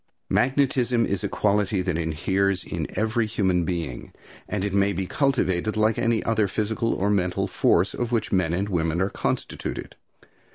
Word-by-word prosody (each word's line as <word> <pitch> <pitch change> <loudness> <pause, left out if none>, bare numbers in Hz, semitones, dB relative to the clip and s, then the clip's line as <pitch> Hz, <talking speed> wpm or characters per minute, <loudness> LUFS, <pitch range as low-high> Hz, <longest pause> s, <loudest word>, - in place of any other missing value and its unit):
Magnetism 125 -3 +2
is 100 -2 -2
a - - -1
quality 100 -2 +1
that 90 -3 -1
inheres 95 +4 0
in 80 -2 -4
every 110 +1 +1
human 95 -5 +1
being, 80 -8 -4 0.4
and 100 -2 -1
it 100 - -2
may 100 0 +3
be 95 - -2
cultivated 110 - 0
like 110 0 +2
any 115 -1 +1
other 110 -2 +1
physical 110 +3 -1
or 100 +2 0
mental 90 -3 0
force 90 +4 +2
of 120 -1 -3
which 115 -3 0
men 90 -4 +2
and 95 +4 -1
women 85 -3 0
are 95 +2 0
constituted. - - -3
100 Hz, 165 wpm, -25 LUFS, 90-110 Hz, 0.4 s, may